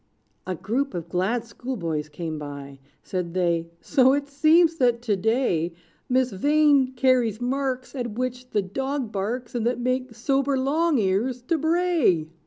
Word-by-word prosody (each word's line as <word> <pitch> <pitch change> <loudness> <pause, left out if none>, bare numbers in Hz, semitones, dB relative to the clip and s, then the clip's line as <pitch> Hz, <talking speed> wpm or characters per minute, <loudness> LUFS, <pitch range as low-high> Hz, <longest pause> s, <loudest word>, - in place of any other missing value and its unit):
A 185 - -2
group 255 - -2
of 170 -1 -5
glad 205 +7 0
schoolboys 170 - -4
came 155 0 -5
by: 140 -2 -8 0.2
Said 180 -2 -4
they, 170 -2 0
"So 265 -2 +4
it 285 0 -1
seems, 320 +3 +4
that 240 -3 +2
to 215 -4 +1
day, 190 -6 0 0.3
Miss 255 0 +2
Vain 285 +3 +3
carries 245 -4 +2
marks 260 +1 -2
At 240 -5 -4
which 250 0 -3
the 205 - 0
dog 265 +4 -3
barks, 230 +5 -3
And 235 -2 0
that 245 +1 -1
make 255 -1 -2
sober 270 +3 +1
Long 300 +4 +1
Ears 225 +5 0
to 325 +6 0
bray." 320 - +2
245 Hz, 155 wpm, -24 LUFS, 190-270 Hz, 0.3 s, So